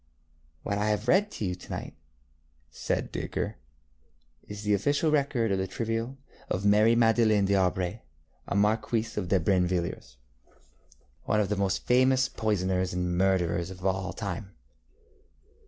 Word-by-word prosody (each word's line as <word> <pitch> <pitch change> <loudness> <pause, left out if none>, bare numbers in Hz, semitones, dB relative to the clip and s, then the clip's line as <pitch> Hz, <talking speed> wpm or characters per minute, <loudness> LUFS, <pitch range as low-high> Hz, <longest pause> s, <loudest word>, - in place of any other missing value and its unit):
ŌĆØ - - -3
ŌĆ£What - - 0
I 105 +1 +1
have 105 +2 -1
read 195 +9 +4
to 110 - -5
you 90 - -1
to 90 - -12
night, - - -5 0.8
ŌĆØ - - -25
said - - -2
Dacre, - - -3 0.9
ŌĆ£is 105 0 -7
the 105 0 +2
official 145 - +1
record 135 -7 +1
of 95 - +1
the 95 - -1
trial 115 +5 -3 0.3
of 95 +2 -2
Marie 105 +3 +5
Madeleine 115 -3 +4
dŌĆÖAubray, 95 0 +1 0.6
Marquise 110 +2 +1
de 95 -2 0
Brinvilliers, 90 -5 -1 1.1
one 105 - +1
of 100 -2 +1
the 105 - 0
most 95 -1 -1
famous 130 +1 +4
poisoners 95 -4 -1
and 90 -1 -1
murderers 90 -2 +1
of 95 0 -9
all 95 0 0
time. 100 -1 -6
100 Hz, 140 wpm, -28 LUFS, 95-115 Hz, 1.1 s, Marie